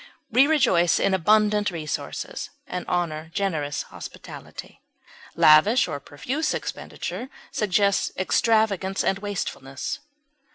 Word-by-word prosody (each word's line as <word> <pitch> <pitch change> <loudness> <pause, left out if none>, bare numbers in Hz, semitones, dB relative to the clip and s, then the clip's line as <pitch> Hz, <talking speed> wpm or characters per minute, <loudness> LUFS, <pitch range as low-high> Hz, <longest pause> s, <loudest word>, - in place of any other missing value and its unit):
We 255 +5 +6
rejoice 235 - +3
in 195 - +2
abundant 210 +3 +3
resources, 160 -4 -5 0.2
and 180 - -5
honor 160 -3 -2
generous 160 -8 -1
hospitality; - - -10 0.5
lavish 180 +11 +6
or 145 - -4
profuse 265 - -3
expenditure 255 - -5 0.2
suggests 200 -1 +1
extravagance 195 -1 +1
and 190 - +1
wastefulness. 160 -9 -4
195 Hz, 95 wpm, -24 LUFS, 160-215 Hz, 0.5 s, We